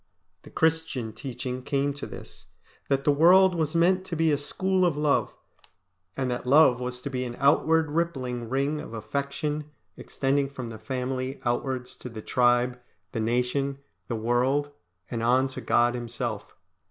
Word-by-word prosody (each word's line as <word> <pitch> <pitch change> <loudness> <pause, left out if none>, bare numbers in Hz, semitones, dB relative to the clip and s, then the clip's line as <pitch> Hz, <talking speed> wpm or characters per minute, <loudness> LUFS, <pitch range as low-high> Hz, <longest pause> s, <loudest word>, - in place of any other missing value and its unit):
The - - -14
Christian 160 -8 0
teaching 125 +1 -5
came 140 +1 0
to 145 - -7
this, - - -11 0.4
that 135 -1 +1
the 145 - +4
world 180 +6 +6
was 160 -2 -1
meant 185 +3 +3
to 180 - -4
be 160 0 +2
a - - +4
school 185 +5 0
of 170 -5 +2
love, 150 -1 +1 0.8
and 130 -2 -1
that 125 0 -4
love 135 -2 +6
was 125 0 -4
to 140 - -4
be 130 -1 -2
an 120 -1 -5
outward 160 +2 +3
rippling 130 -8 -2
ring 140 +4 0
of 115 - -8
affection 140 +6 -3 0.3
extending 140 0 -1
from 130 -4 -7
the 110 -1 -8
family 130 +1 -3
outwards 125 +1 -2
to 125 - -8
the 110 -2 -8
tribe, 125 0 +2 0.3
the 115 - -3
nation, 125 +4 0 0.3
the 120 - -2
world, 125 +6 +1 0.4
and 115 - -2
on 125 +3 +3
to 130 - -7
God 120 0 +3
Himself. 120 -1 -5
135 Hz, 165 wpm, -26 LUFS, 125-150 Hz, 0.8 s, world